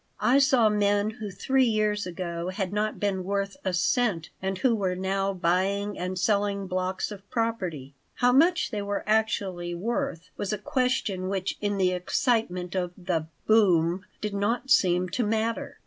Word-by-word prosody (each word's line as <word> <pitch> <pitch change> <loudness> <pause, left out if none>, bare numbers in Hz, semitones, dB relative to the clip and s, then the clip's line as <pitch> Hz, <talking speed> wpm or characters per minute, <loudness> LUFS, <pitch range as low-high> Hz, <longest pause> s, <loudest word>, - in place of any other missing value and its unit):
I 260 +3 +4
saw 260 -4 +4
men 205 0 +2
who 220 -2 -7
three 260 +8 +1
years 210 -3 0
ago 170 -1 -4
had 190 0 -3
not 210 +1 -1
been 195 -2 -1
worth 200 +1 -2
a 185 - 0
cent 180 -2 +1
and 190 0 -2
who 245 +5 +2
were 190 -4 0
now 195 +1 -1
buying 195 +3 0
and 180 +1 -4
selling 200 0 +1
blocks 185 +1 -2
of 200 -1 -10
property. 185 - -2 0.2
How 245 0 +3
much 335 +5 +3
they 210 -3 -2
were 200 0 -3
actually 195 -5 0
worth 180 -3 -3
was 205 - -2
a 210 - -1
question 250 -7 -1
which 195 -1 -2
in 205 -1 0
the 185 -1 +3
excitement 180 -1 0
of 180 -2 -2
the 175 -4 -2 0.2
"boom" 185 -4 +3 0.2
did 210 -1 -3
not 230 +6 -1
seem 180 -5 +4
to 240 +8 -1
matter. 225 +1 -1
200 Hz, 165 wpm, -27 LUFS, 185-220 Hz, 0.2 s, I